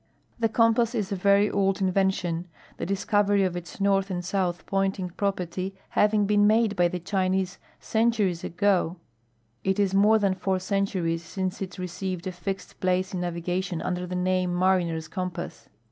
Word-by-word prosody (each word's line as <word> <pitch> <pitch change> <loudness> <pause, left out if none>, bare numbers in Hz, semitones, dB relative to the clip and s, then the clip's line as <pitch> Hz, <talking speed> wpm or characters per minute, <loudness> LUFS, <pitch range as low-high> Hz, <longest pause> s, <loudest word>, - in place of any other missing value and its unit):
Tlie 225 -1 +2
compass 230 +1 +3
is 210 -4 -2
a - - 0
very 200 +2 +4
(jld 195 0 +1
invention, 185 -3 0 0.3
the - - -4
discovery 200 +1 +2
its 175 -1 -4
north 195 0 +2
and 175 -2 -3
south 180 -2 -1
jfointing 195 -2 -1
j)ropcrty 185 -1 -2 0.2
having 210 0 +3
been 205 0 +4
made 215 -1 +3
by 175 -1 +4
the 180 - -3
Chinese 185 0 -1 0.2
centuries 220 -6 +1
ago 185 -1 +1 0.7
It 190 0 +1
is 195 -2 +2
more 210 +3 +5
than 200 -3 +2
four 190 0 -1
centuries 185 -3 -1
since 185 +3 -4
it 190 -1 -5
receiveil 180 0 -4
a - - -2
(lxe<l 185 +2 -5
i>lace 185 +1 +1
in 180 - -2
navigation 175 +1 -2
under 180 +1 -3
the 180 - -4
name 180 -1 0
Mariner's 175 -3 +1
Compass. 175 -9 -5
190 Hz, 160 wpm, -26 LUFS, 180-200 Hz, 0.7 s, more